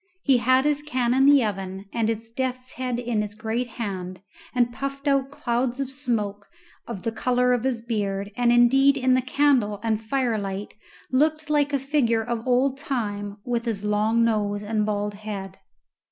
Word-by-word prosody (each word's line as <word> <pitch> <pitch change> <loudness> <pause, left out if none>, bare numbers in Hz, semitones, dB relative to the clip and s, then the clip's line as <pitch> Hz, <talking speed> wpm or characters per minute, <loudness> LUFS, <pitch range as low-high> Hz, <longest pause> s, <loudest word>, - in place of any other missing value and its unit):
He 270 -3 +4
had 255 +3 +3
his 295 -1 +2
can 255 -5 0
in 270 +1 +4
the 285 -3 +6
oven 195 -1 -4
and 225 -1 +1
his 225 0 -4
death's 255 +1 -3
head 250 -2 -3
in 240 -3 -1
his 210 0 -5
great 225 +3 -2
hand, 190 -6 -5 0.4
and 240 -1 +2
puffed 275 +2 -5
out 275 -1 +2
clouds 245 -1 -1
of 270 -1 -2
smoke 215 -7 -2 0.4
of 225 -6 -6
the 230 - -1
colour 250 +2 +2
of 245 -2 0
his 240 -4 -1
beard, 200 -3 -2
and 240 0 +3
indeed 270 +4 +5
in 255 -1 +3
the 255 - +3
candle 255 -6 +2
and 220 -1 0
fire 235 -1 0
light 195 0 -5 0.4
looked 305 +3 +1
like 290 -1 +2
a 280 - +2
figure 260 -5 +1
of 235 +1 -4
old 260 +2 +2
Time 205 -7 -3
with 240 -1 -1
his 210 -3 -3
long 215 +2 +2
nose 210 -2 0
and 210 0 0
bald 205 0 -1
head. 200 -2 -7
235 Hz, 180 wpm, -24 LUFS, 210-260 Hz, 0.4 s, the